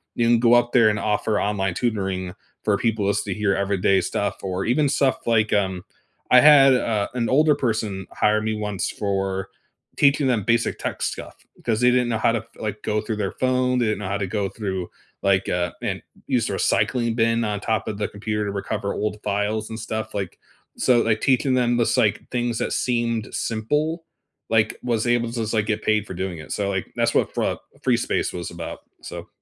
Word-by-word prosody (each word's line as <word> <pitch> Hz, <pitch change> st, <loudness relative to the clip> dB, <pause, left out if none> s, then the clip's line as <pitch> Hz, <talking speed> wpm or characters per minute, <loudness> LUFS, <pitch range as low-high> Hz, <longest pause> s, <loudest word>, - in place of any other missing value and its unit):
you 115 Hz, -, +2 dB
can 120 Hz, 0 st, +4 dB
go 120 Hz, 0 st, +4 dB
up 120 Hz, 0 st, +4 dB
there 115 Hz, -3 st, +5 dB
and 105 Hz, -, 0 dB
offer 105 Hz, 0 st, 0 dB
online 95 Hz, -2 st, 0 dB
tutoring 95 Hz, -6 st, -2 dB, 0.3 s
for 105 Hz, -2 st, +2 dB
people 110 Hz, -2 st, 0 dB
as 100 Hz, +1 st, +1 dB
to 100 Hz, -, -3 dB
hear 100 Hz, 0 st, +1 dB
everyday 100 Hz, 0 st, +2 dB
stuff 100 Hz, +3 st, -2 dB
or 95 Hz, 0 st, -2 dB
even 145 Hz, +5 st, +2 dB
stuff 135 Hz, -3 st, 0 dB
like, 110 Hz, -2 st, +2 dB
um 95 Hz, -3 st, 0 dB, 0.5 s
I 125 Hz, -, +9 dB
had, 145 Hz, -3 st, +8 dB
uh, 110 Hz, -4 st, 0 dB
an 120 Hz, -2 st, -1 dB
older 150 Hz, +2 st, +4 dB
person 110 Hz, -7 st, -2 dB
hire 105 Hz, 0 st, +2 dB
me 110 Hz, 0 st, -1 dB
once 105 Hz, -3 st, -2 dB
for 95 Hz, -1 st, -2 dB, 0.5 s
teaching 140 Hz, 0 st, +4 dB
them 120 Hz, -5 st, +1 dB
basic 115 Hz, +3 st, +1 dB
tech -, -, -4 dB
stuff, -, -, -4 dB, 0.3 s
'cause 115 Hz, -1 st, 0 dB
they 125 Hz, -, +6 dB
didn't 125 Hz, -1 st, +2 dB
know 115 Hz, -, 0 dB
how 115 Hz, -, +3 dB
to 115 Hz, -, +1 dB
f 110 Hz, -, -13 dB
like, 105 Hz, -1 st, -4 dB
go 105 Hz, 0 st, 0 dB
through 110 Hz, 0 st, -3 dB
their 100 Hz, -3 st, -1 dB
phone, 130 Hz, 0 st, +1 dB
they 120 Hz, -, +2 dB
didn't 110 Hz, -1 st, 0 dB
know 105 Hz, -, -4 dB
how 100 Hz, -, -1 dB
to 100 Hz, -1 st, -2 dB
go 100 Hz, +1 st, -1 dB
through, 95 Hz, -5 st, -4 dB, 0.3 s
like, 100 Hz, -1 st, +2 dB
uh 90 Hz, -1 st, 0 dB
and -, -, -3 dB, 0.3 s
use -, -, +1 dB
the -, -, -3 dB
recycling 120 Hz, -3 st, +1 dB
bin 115 Hz, 0 st, +2 dB
on 105 Hz, -1 st, -2 dB
top 110 Hz, +1 st, -1 dB
of 105 Hz, -, -3 dB
the 105 Hz, -, 0 dB
computer 105 Hz, +1 st, -3 dB
to 100 Hz, -, -2 dB
recover 100 Hz, 0 st, -3 dB
old 105 Hz, 0 st, -2 dB
files 105 Hz, +2 st, -1 dB
and 110 Hz, 0 st, -6 dB
stuff, 110 Hz, -1 st, -4 dB
like 95 Hz, -3 st, -4 dB, 0.4 s
so, 120 Hz, -2 st, +4 dB
like, 110 Hz, -2 st, +1 dB
teaching 130 Hz, 0 st, +2 dB
them 120 Hz, -1 st, +2 dB
this, 120 Hz, -, +2 dB
like, -, -, +2 dB
things 120 Hz, -2 st, -1 dB
that -, -, -2 dB
seemed 115 Hz, -3 st, 0 dB
simple, 150 Hz, +9 st, -1 dB, 0.5 s
like, 110 Hz, -1 st, +2 dB
was 120 Hz, -2 st, 0 dB
able 120 Hz, -1 st, +2 dB
to 115 Hz, -, -7 dB
just 110 Hz, 0 st, -3 dB
like 105 Hz, -2 st, +1 dB
get 110 Hz, 0 st, -1 dB
paid 105 Hz, -1 st, +2 dB
for -, -, -6 dB
doing 95 Hz, -1 st, -3 dB
it 80 Hz, -, -10 dB
so, 100 Hz, -1 st, -1 dB
like, 95 Hz, -2 st, -2 dB
that's 115 Hz, 0 st, +1 dB
what -, -, +2 dB
Fra -, -, 0 dB, 0.3 s
Freespace -, -, +1 dB
was 90 Hz, -1 st, -5 dB
about, 85 Hz, -1 st, -7 dB, 0.2 s
so -, -, -8 dB
110 Hz, 210 wpm, -23 LUFS, 100-120 Hz, 0.5 s, I